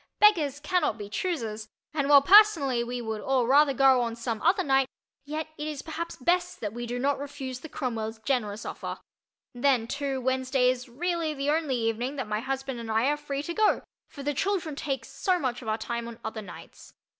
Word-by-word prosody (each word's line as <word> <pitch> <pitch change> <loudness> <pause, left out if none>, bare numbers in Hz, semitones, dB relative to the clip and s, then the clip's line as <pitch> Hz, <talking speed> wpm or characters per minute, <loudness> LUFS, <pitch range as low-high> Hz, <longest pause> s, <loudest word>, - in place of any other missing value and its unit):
"Beggars 315 -10 +4
cannot 320 - 0
be 205 -2 -7
choosers," 225 -11 -3 0.3
and 285 -2 0
while 285 -1 +8
personally 325 - +6
we 245 +1 -4
would 220 -1 -4
all 260 -1 +1
rather 280 +3 +5
go 265 -1 +5
on 230 -1 -2
some 230 -2 -3
other 370 +4 +3
night, 270 -3 +3 0.4
yet 310 +2 -4
it 300 - -3
is 300 -3 -5
perhaps 335 +1 -5
best 355 +6 0
that 210 -1 -4
we 240 0 -5
do 245 +1 -3
not 275 +3 0
refuse 275 -3 -6
the 315 - -10
Cromwells' 225 -6 -3
generous 225 -6 -1
offer. - - -5 0.6
Then, 245 -2 +2
too, 275 +1 -2
Wednesday 260 0 +2
is 250 -1 -6
really 330 +3 -2
the 280 +1 0
only 305 -4 0
evening 235 +3 -1
that 265 - -3
my 210 0 -1
husband 265 0 -3
and 230 -1 -7
I 225 +5 +2
are 295 - +2
free 285 -1 -4
to 340 - -4
go, 430 +3 +2 0.2
for 280 - -10
the 290 +1 0
children 350 -2 -1
take 275 -2 -3
so 370 -2 0
much 260 -7 -2
of 235 - -10
our 215 0 0
time 235 0 -4
on 235 -1 -8
other 220 0 -4
nights. 200 - -12
270 Hz, 205 wpm, -27 LUFS, 235-300 Hz, 0.6 s, while